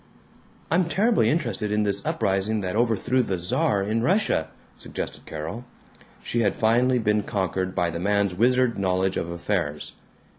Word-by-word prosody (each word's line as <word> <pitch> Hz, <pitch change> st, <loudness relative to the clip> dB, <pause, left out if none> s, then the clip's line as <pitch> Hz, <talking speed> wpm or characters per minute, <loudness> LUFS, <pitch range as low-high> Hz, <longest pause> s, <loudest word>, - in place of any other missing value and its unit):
"I'm 180 Hz, +2 st, +3 dB
terribly 215 Hz, +7 st, +2 dB
interested 120 Hz, -, -1 dB
in 105 Hz, 0 st, +2 dB
this 100 Hz, -1 st, -1 dB
uprising 100 Hz, +3 st, 0 dB
that 95 Hz, +1 st, -3 dB
overthrew 120 Hz, +2 st, +2 dB
the 95 Hz, -6 st, -2 dB
Czar 95 Hz, +3 st, 0 dB
in 110 Hz, +3 st, 0 dB
Russia," 170 Hz, -, +1 dB, 0.3 s
suggested -, -, -7 dB
Carol. 80 Hz, +10 st, -6 dB, 0.6 s
She 120 Hz, -, -1 dB
had 100 Hz, -4 st, +1 dB
finally 120 Hz, +3 st, +3 dB
been 105 Hz, -2 st, +1 dB
conquered 95 Hz, -2 st, -2 dB
by 85 Hz, -1 st, +1 dB
the 85 Hz, -, -4 dB
man's 100 Hz, 0 st, +1 dB
wizard 125 Hz, +3 st, +2 dB
knowledge 95 Hz, 0 st, +1 dB
of 85 Hz, -, -2 dB
affairs. 85 Hz, -4 st, -2 dB
105 Hz, 150 wpm, -24 LUFS, 95-120 Hz, 0.6 s, I'm